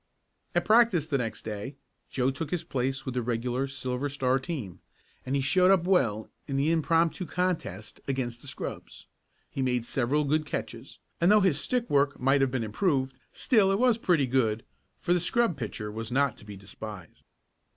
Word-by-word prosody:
At - - +2
practice 215 -8 +4
the 140 -4 0
next 115 -3 -4
day 110 +5 -5 0.3
Joe 130 0 +1
took 145 +3 -5
his 180 -2 -2
place 135 +1 -2
with 130 - -3
the 125 - 0
regular 120 +3 -1
Silver 130 0 -3
Star 135 -1 +1
team, 130 - -6 0.5
and 135 - 0
he 135 - +1
showed 180 +6 +4
up 190 -3 +5
well 125 - +2 0.2
in 135 -2 -2
the 145 +4 +2
impromptu 165 +2 +1
contest 160 - -3
against 125 -3 -2
the - - -11
scrubs. 130 - -7 0.5
He 135 - -3
made 125 -2 0
several 135 +5 +1
good 155 +2 +1
catches, 150 - -6 0.2
and 175 +4 +5
though 210 0 +6
his 180 -7 +2
stick 245 -2 -1
work 140 0 +2
might 135 +2 +3
have 135 - +3
been 125 -2 -2
improved, 130 - 0
still 205 -6 +3
it 195 - +2
was 240 -1 +3
pretty 170 -10 +3
good, 115 -4 +1 0.3
for 175 - +1
the 180 - +2
scrub 230 +2 +1
pitcher 105 -4 -5
was 115 +2 -6
not 140 -2 +2
to - - -14
be 105 -2 -9
despised. 100 -2 -10
135 Hz, 185 wpm, -28 LUFS, 120-165 Hz, 0.5 s, though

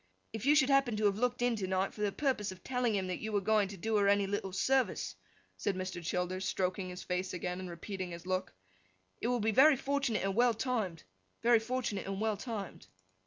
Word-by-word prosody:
If 225 +4 -4
you 295 - +6
should 285 -2 +4
happen 270 -5 +3
to 215 - +1
have 200 0 +2
looked 245 0 0
in 245 -1 +2
to 190 -3 -2
night, 190 +1 0
for 210 - -8
the 205 -1 +1
purpose 210 -6 -1
of 185 - -12
telling 250 -4 0
him 190 -1 0
that 185 -1 -3
you 220 - -4
were 205 - +2
going 210 +1 +2
to 195 0 -8
do 220 +4 0
her 200 -1 +3
any 200 0 +4
little 195 -1 -2
service,' 190 - +1 0.4
said 195 - -1
Mr. 185 -2 -4
Childers, 180 +2 -2
stroking 185 0 -1
his 180 +1 -7
face 180 0 -2
again, 180 +1 -3
and 185 -1 -6
repeating 185 +2 -5
his 170 0 -8
look, 185 - -2 0.7
'it - - 0
would 245 -3 0
be 220 - +3
very 275 +7 +7
fortunate 275 -5 0
and 195 0 0
well 240 0 +4
timed; 215 -8 -2 0.4
very 235 -1 +6
fortunate 225 -4 -2
and 195 0 -3
well 215 0 +1
timed. 205 - -6
205 Hz, 225 wpm, -33 LUFS, 185-240 Hz, 0.7 s, very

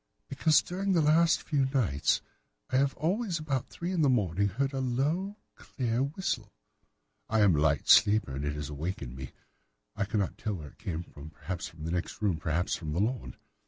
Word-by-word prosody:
"'Because 155 +3 +4
during 190 +2 -1
the 170 - +4
last 165 +3 +4
few 140 -4 +1
nights 120 - +1 0.5
I 130 - +3
have 135 0 +2
always, 185 +4 0
about 145 -5 -2
three 175 +2 -4
in 180 -3 +1
the 145 - +4
morning, 100 -5 +2
heard 135 +8 -1
a 135 - -2
low, 150 - -1 0.2
clear 120 -3 -3
whistle. 140 - -2 0.8
I 110 0 +2
am 100 -5 +5
a - - +1
light 75 -2 +2
sleeper, 105 -9 +5
and 70 - -4
it 75 0 -1
has 75 -2 -5
awakened 75 -4 -4
me. 65 -1 -7 0.7
I - - 0
cannot 100 -2 -2
tell 105 -2 -2
where 75 -5 -8
it - - -22
came 85 -2 -4
from—perhaps 80 +4 -7
from 80 -2 -12
the 80 - -3
next 90 0 -3
room, 100 -6 +1
perhaps 80 +3 -1
from 75 -3 -5
the 85 - -1
lawn. 120 +5 -1
110 Hz, 195 wpm, -30 LUFS, -, 0.8 s, am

